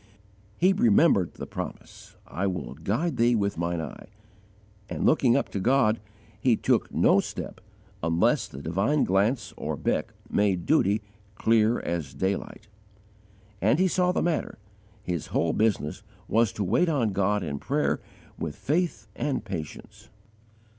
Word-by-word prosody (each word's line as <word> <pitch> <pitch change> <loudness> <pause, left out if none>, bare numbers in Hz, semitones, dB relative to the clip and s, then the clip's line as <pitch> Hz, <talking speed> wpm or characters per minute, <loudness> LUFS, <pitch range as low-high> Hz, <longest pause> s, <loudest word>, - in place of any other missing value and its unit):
He 185 +3 +4
remembered 195 - +4
the - - -6
promise, - - -8
"I 90 +8 -2
will 90 -6 -4
guide 115 - -2
thee 120 +1 +4
with 100 -2 0
Mine 85 0 -1
eye," 80 -3 -7 0.8
and - - -2
looking 130 -5 +4
up 140 - -1
to 100 - -3
God, 115 0 +3 0.4
he 120 +1 +3
took - - +1
no - - +4
step - - -5 0.4
unless 85 +1 +2
the 70 +2 -10
divine 100 - +1
glance 100 +3 +1
or - - -3
beck - - -1 0.2
made 95 -4 +1
duty 105 -8 +2 0.3
"clear 110 +1 +3
as 85 -5 -4
daylight." 100 +2 -3 0.9
As 110 +7 +3
he 185 +2 +3
saw 180 0 +2
the - - 0
matter, 170 -2 -1 0.5
his 90 -5 -3
whole 80 -1 0
business 105 -9 0 0.3
was 115 -1 +3
to 105 - -2
wait 115 - +2
on 125 -9 +1
God 100 +1 +1
in 70 -4 -4
prayer - - 0 0.4
with 75 -3 -4
faith 160 - -1
and 135 -6 -2
patience. 85 -7 -7
105 Hz, 145 wpm, -27 LUFS, 90-135 Hz, 0.9 s, He